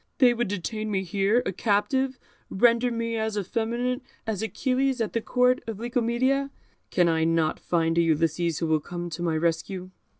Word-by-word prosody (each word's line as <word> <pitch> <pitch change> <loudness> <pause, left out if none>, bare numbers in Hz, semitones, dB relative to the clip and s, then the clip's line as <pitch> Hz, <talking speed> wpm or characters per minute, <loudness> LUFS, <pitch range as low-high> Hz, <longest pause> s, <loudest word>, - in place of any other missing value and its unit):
They 250 -3 +6
would 240 0 -1
detain 215 +3 -3
me 190 -2 0
here, 200 +6 +1
a - - 0
captive, 255 +7 +1 0.3
render 235 +4 +3
me 230 -1 -2
as 220 -1 -2
effeminate 235 +5 -1 0.2
as 220 -3 -2
Achilles 260 +3 0
at 225 -3 -1
the 230 - 0
Court 250 +2 +2
of 225 -3 -4
Licomedia. 245 +4 0 0.4
Can 175 -2 +3
I 160 -1 +2
not 165 -1 +1
find 165 -1 +1
a - - +6
Ulysses 165 0 +1
who 165 - -1
will 160 -1 +2
come 175 +2 -6
to 165 +2 -5
my 165 -2 0
rescue?" 170 +3 -2
215 Hz, 175 wpm, -26 LUFS, 170-240 Hz, 0.4 s, They